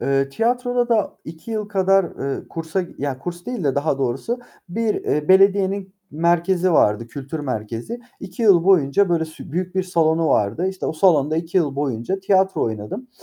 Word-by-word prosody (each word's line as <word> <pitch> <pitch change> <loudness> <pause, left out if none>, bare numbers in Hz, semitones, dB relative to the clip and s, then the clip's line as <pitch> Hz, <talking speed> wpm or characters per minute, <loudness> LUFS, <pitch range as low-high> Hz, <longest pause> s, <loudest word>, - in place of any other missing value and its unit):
Eee, 135 0 +1
tiyatroda 245 - 0
da 225 -3 +1
2 160 +7 -10
yıl 215 -2 -3
kadar, 195 -1 +3
eee, 140 -4 -5
kursa 165 +3 -3 0.2
ya, 140 -2 -3
kurs 175 +4 -7
değil 245 -8 -4
de 140 -2 +1
daha 140 -1 0
doğrusu, 135 - -2 0.3
bir, 220 +4 -1
eee, 150 0 -2
belediyenin 195 0 +3 0.2
merkezi 170 +3 +1
vardı, 105 -6 +3
kültür 140 +5 -6
merkezi. 120 - -5 0.2
2 195 +6 -7
yıl 190 -6 +5
boyunca 185 0 +4
böyle 170 -2 +1
s 155 -2 -11
büyük 180 +1 -3
bir 190 - +1
salonu 165 -3 +1
vardı. 115 - +1
İşte 190 -1 -5
o - - -1
salonda 155 -3 +3
2 165 +2 -3
yıl 150 -6 +1
boyunca 140 +6 -2
tiyatro 190 0 +2
oynadım. 110 - -4
170 Hz, 170 wpm, -21 LUFS, 140-195 Hz, 0.3 s, yıl